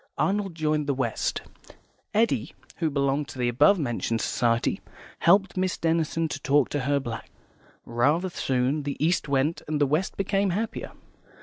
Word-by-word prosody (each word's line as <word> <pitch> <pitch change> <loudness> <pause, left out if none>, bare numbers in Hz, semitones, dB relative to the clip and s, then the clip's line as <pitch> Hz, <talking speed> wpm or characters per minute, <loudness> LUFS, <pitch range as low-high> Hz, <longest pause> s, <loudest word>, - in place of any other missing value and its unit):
Arnold 195 -3 0
joined 155 -2 0
the 140 - +1
West; 120 -4 -1 0.7
Eddy, 225 +2 +1 0.2
who 165 -2 0
belonged 140 0 0
to - - -10
the 125 -1 0
above 145 +11 +5
mentioned 120 -5 -1
society, 115 +1 0 0.4
helped 195 +2 +4
Miss 185 -1 0
Denison 165 0 0
to 145 - -4
talk 140 -2 +3
to 145 - -1
her 140 0 +3
black. 115 -4 -6 0.6
Rather 145 +10 +1
soon 130 0 0
the 140 -1 -4
East 165 +1 +1
went, 140 +4 +1
and 150 -1 -1
the 145 - +4
West 155 +7 -1
became 195 0 +1
happier. 215 +6 -3
150 Hz, 160 wpm, -26 LUFS, 135-175 Hz, 0.7 s, above